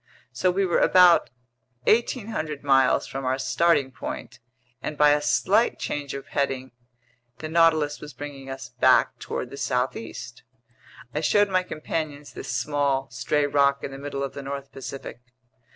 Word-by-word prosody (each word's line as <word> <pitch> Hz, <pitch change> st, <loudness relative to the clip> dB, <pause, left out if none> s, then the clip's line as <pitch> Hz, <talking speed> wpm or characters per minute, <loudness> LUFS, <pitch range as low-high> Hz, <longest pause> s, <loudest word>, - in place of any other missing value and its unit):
So 185 Hz, -, +1 dB
we 195 Hz, +2 st, +1 dB
were 175 Hz, -, +2 dB
about 180 Hz, -2 st, +6 dB, 0.5 s
1,800 215 Hz, -, 0 dB
miles 135 Hz, -2 st, +4 dB
from 135 Hz, 0 st, -6 dB
our 130 Hz, +1 st, 0 dB
starting 140 Hz, +1 st, +2 dB
point, 125 Hz, 0 st, -7 dB, 0.4 s
and 150 Hz, -, -5 dB
by 150 Hz, 0 st, +6 dB
a 145 Hz, 0 st, +3 dB
slight 145 Hz, -, +2 dB
change 145 Hz, -2 st, -4 dB
of 140 Hz, 0 st, -8 dB
heading, 130 Hz, -2 st, -2 dB, 0.7 s
the 155 Hz, -, -6 dB
Nautilus 160 Hz, -2 st, +3 dB
was 150 Hz, -, -8 dB
bringing 140 Hz, 0 st, -8 dB
us 135 Hz, -2 st, -6 dB
back -, -, +3 dB
toward -, -, -5 dB
the -, -, -8 dB
southeast. -, -, -3 dB, 0.7 s
I 150 Hz, -, -1 dB
showed 205 Hz, +5 st, +3 dB
my 185 Hz, -1 st, +2 dB
companions 155 Hz, -4 st, -5 dB
this -, -, -8 dB
small, 135 Hz, +1 st, 0 dB
stray 145 Hz, +4 st, 0 dB
rock 140 Hz, -1 st, +2 dB
in -, -, -4 dB
the 135 Hz, -, -8 dB
middle 140 Hz, -1 st, -4 dB
of 140 Hz, -, -4 dB
the 140 Hz, -, -6 dB
north 140 Hz, 0 st, -6 dB
Pacific. 135 Hz, -2 st, -8 dB
145 Hz, 155 wpm, -25 LUFS, 135-160 Hz, 0.7 s, about